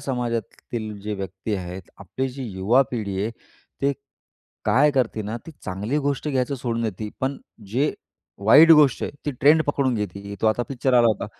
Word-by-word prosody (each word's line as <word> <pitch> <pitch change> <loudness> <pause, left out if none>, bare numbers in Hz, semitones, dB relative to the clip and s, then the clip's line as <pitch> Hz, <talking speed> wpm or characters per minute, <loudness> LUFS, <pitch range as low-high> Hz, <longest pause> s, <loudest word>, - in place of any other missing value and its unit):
समाजातील 115 -4 -4
जे 105 +1 -4
व्यक्ती 95 +2 -4
आहेत, 90 0 -5 0.2
आपली 130 0 -3
जी 130 +1 -7
युवा 100 +8 +3
पिढी 100 -5 -3
आहे, 110 - -1 0.5
ते 140 +1 +3 0.7
काय 150 +3 +4
करते 125 -5 0
ना, 105 +3 -4
ती - - -7
चांगली 105 +9 -2
गोष्ट 145 +1 -1
घ्यायचं 135 -1 0
सोडून 120 -3 -2
देते, 110 -1 -3
पण 135 +1 -1 0.3
जे 140 +5 +2 0.5
वाईट 155 +9 +8
गोष्ट 150 -6 +5
आहे - - -2 0.2
ती - - +1
ट्रेंड 155 +3 +6
पकडून 140 -3 0
घेते 100 -3 -4
ते. 100 0 -6
तो - - +1
आता 110 +3 +2
पिक्चर 130 -1 0
आला 120 -1 +6
होता. 105 -2 -1
120 Hz, 180 wpm, -23 LUFS, 105-135 Hz, 0.7 s, वाईट